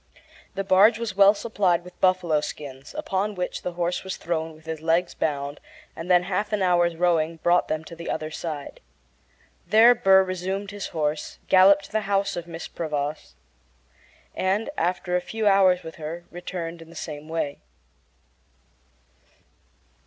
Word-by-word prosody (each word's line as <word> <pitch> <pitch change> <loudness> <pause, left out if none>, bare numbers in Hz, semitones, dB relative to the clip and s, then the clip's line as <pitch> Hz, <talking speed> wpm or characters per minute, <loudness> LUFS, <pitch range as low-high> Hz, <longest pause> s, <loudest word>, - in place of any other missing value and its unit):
The 195 - -1
barge 195 +4 +5
was 230 -4 -4
well 200 +1 +6
supplied 195 -6 0
with 180 0 -15
buffalo 180 -5 +3
skins, 140 - -8
upon 210 -9 -2
which 180 -1 -3
the 180 - -4
horse 175 +1 -2
was 190 0 -5
thrown 160 -1 -3
with 155 +1 -19
his 160 -1 -5
legs 170 +2 +1
bound, 145 -1 -2 0.4
and 165 +2 -7
then 180 -1 +5
half 195 +3 -2
an 210 -2 0
hour's 175 -2 +3
rowing 165 -1 +1
brought 175 +2 +2
them 155 0 -2
to 165 +2 -10
the 170 0 -7
other 155 0 -3
side. 155 -3 -6 0.9
There 230 +3 +7
Burr 195 -5 +5
resumed 190 +2 -4
his 205 -1 -5
horse, 150 -2 -3
galloped 195 +1 +6
to - - -16
the 215 -2 -2
house 200 0 +1
of 175 - -5
Mrs. 165 -1 -8
Prevost, 150 - -4 1.0
and, 205 +8 0
after 180 +1 -1
spending 180 0 +2
a - - -17
few 220 -1 -1
hours 190 -2 +4
with 160 - -9
her, 165 +2 -6
returned 170 -1 -6
in 165 - -13
the 170 - -14
same 155 -1 -7
way. 160 -3 -3
175 Hz, 165 wpm, -25 LUFS, 160-195 Hz, 1.0 s, There